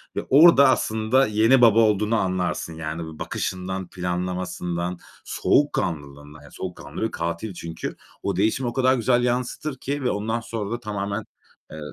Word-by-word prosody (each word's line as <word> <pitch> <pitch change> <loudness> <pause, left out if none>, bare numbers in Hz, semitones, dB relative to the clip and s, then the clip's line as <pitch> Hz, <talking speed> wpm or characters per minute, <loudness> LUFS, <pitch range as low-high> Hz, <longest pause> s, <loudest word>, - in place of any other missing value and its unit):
ve - - -1
orada 140 0 +7
aslında 110 +4 +2
yeni 110 +5 +4
baba 115 -2 +6
olduğunu 105 0 +3
anlarsın, 90 -4 -1
yani, 80 +1 -5
bir - - -15
bakışından, 95 0 -3
planlamasından, 90 -1 -3 0.3
soğukkanlılığından, 75 - -1
yani, 70 - -15
soğukkanlı 80 -4 -7
bir 110 - 0
katil 85 +5 -4
çünkü. 85 -1 -6 0.3
O 100 -2 -1
değişimi 110 +6 +1
o - - -7
kadar 130 0 +3
güzel 120 +1 +2
yansıtır 125 +3 -2
ki 140 +1 -4
ve 125 - +1
ondan 110 +3 -2
sonra 115 -2 -5
da 120 - -2
tamamen 100 -1 -3 0.5
eee 80 - -8
105 Hz, 150 wpm, -24 LUFS, 90-120 Hz, 0.5 s, orada